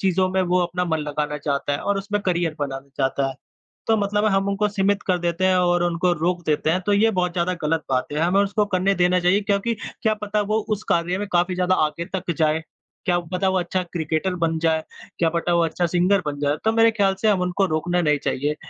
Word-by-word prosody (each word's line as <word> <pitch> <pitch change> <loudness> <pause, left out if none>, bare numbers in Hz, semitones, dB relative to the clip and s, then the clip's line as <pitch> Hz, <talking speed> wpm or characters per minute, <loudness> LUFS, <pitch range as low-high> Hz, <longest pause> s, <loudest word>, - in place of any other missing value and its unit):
चीज़ों 190 -1 +2
में 190 - +2
वो 180 - +4
अपना 180 +1 -1
मन 160 -2 -1
लगाना 150 0 -3
चाहता 140 -1 -2
है 140 - -1
और 200 -1 -1
उसमें 205 +1 -2
करियर 170 -3 0
बनाना 135 -1 -4
चाहता 135 0 0
है। 135 - -6 0.5
तो 225 - +4
मतलब 205 +1 0
हम 195 0 +1
उनको 200 +1 +1
सीमित 200 0 0
कर 185 -2 +2
देते 175 +1 0
हैं 185 0 +4
और 175 -1 +2
उनको 175 +1 +1
रोक 175 0 0
देते 155 0 +1
हैं, 185 +3 +1
तो 205 - +2
ये 220 +2 +4
बहुत 180 -1 0
ज़्यादा 180 +1 0
गलत 155 +1 0
बात 130 -1 0
है। 150 - -2
हमें 180 +5 +3
उसको 205 +1 0
करने 190 +2 +2
देना 180 0 +3
चाहिए, 180 +3 +3
क्योंकि 200 +3 0 0.3
क्या 220 - +2
पता 210 0 0
वो 220 - +3
उस 215 -1 -1
कार्य 175 +2 +1
में 205 - -4
काफ़ी 175 +1 +2
ज़्यादा 180 0 +2
आगे 170 +3 -4
तक 180 -2 -3
जाए, 155 0 +2 0.4
क्या 175 -2 +2
पता 190 +1 +1
वो 190 - +1
अच्छा 185 +1 -2
क्रिकेटर 160 +3 -1
बन 165 0 +1
जाए, 160 -1 +1 0.4
क्या 165 -1 +3
पटा 170 +1 -1
वो 170 0 +3
अच्छा 170 +2 -1
सिंगर 180 +3 +2
बन 145 -1 -3
जाए, 145 +1 0
तो 220 - +4
मेरे 225 0 +4
ख़्याल 200 -3 +1
से 220 - +2
हम 195 -3 +2
उनको 180 +2 +1
रोकना 175 +3 0
नहीं 150 -3 +2
चाहिए। 145 +3 -1
180 Hz, 235 wpm, -22 LUFS, 160-195 Hz, 0.5 s, वो